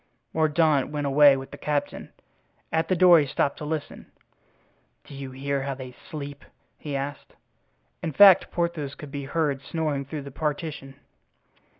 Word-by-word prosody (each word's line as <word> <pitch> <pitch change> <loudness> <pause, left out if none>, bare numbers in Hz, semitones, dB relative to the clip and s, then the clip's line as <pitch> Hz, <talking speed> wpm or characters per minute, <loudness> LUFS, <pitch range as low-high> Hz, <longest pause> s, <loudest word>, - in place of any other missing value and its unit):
Mordaunt 155 -3 +2
went 150 -1 -3
away 140 0 +6
with 135 0 -8
the - - -10
captain. 150 -1 -3 0.6
At 160 0 0
the 185 - +1
door 175 -1 +7
he 145 - 0
stopped 140 +1 -1
to 150 - -7
listen. 155 -1 -5 1.0
"Do - - -14
you 135 -1 -7
hear 135 +1 -3
how 135 0 -3
they 130 -1 -9
sleep?" 145 -4 -7 0.4
he 145 -2 -5
asked. 140 +1 -5 0.7
In 160 - -3
fact, 195 +5 +7
Porthos 170 -5 -2
could 150 -2 -10
be 140 -1 -5
heard 145 -2 -1
snoring 150 -2 -2
through 145 +1 -6
the 140 - -9
partition. 150 -2 -4
145 Hz, 160 wpm, -25 LUFS, 140-160 Hz, 1.0 s, door